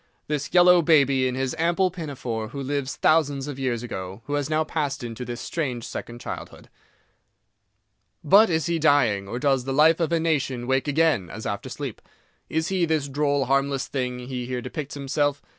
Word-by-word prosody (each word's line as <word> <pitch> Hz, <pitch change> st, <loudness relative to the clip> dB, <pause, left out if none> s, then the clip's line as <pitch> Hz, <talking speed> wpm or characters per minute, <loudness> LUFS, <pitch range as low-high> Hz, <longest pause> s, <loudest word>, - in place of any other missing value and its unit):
This 145 Hz, -1 st, -2 dB
yellow 180 Hz, 0 st, +6 dB
baby, 140 Hz, -5 st, +4 dB
in 125 Hz, -, -2 dB
his 130 Hz, +2 st, -2 dB
ample 175 Hz, +3 st, +2 dB
pinafore, 130 Hz, -, -5 dB
who 140 Hz, +4 st, -6 dB
lived 140 Hz, 0 st, -2 dB
thousands 145 Hz, -4 st, +2 dB
of 140 Hz, -2 st, -6 dB
years 125 Hz, -3 st, -1 dB
ago, 95 Hz, -2 st, -6 dB
who 145 Hz, -, -4 dB
has 145 Hz, 0 st, -1 dB
now 155 Hz, 0 st, +2 dB
passed 145 Hz, -4 st, -3 dB
into 115 Hz, +1 st, -5 dB
this 120 Hz, -1 st, -6 dB
strange 130 Hz, -8 st, -3 dB
second 120 Hz, 0 st, -7 dB
childhood. -, -, -8 dB, 1.5 s
But 200 Hz, +8 st, +6 dB
is 160 Hz, -2 st, 0 dB
he 170 Hz, -1 st, 0 dB
dying—or 120 Hz, -9 st, +2 dB
does 135 Hz, -1 st, +1 dB
the 135 Hz, -, -2 dB
life 155 Hz, +4 st, +5 dB
of 165 Hz, -1 st, 0 dB
a 170 Hz, -, +2 dB
nation 140 Hz, -6 st, -1 dB
wake 130 Hz, +2 st, 0 dB
again, 145 Hz, -, +2 dB
as 110 Hz, -, -8 dB
after 100 Hz, -1 st, -4 dB
sleep? -, -, -6 dB, 0.5 s
Is 160 Hz, +1 st, -1 dB
he 185 Hz, -3 st, +1 dB
this 155 Hz, -3 st, 0 dB
droll, 140 Hz, 0 st, 0 dB
harmless 135 Hz, +1 st, 0 dB
thing 125 Hz, -2 st, -3 dB
he 125 Hz, 0 st, -5 dB
here 125 Hz, -1 st, -2 dB
depicts 135 Hz, +4 st, -6 dB
himself? 145 Hz, +1 st, -1 dB
140 Hz, 180 wpm, -24 LUFS, 125-155 Hz, 1.5 s, yellow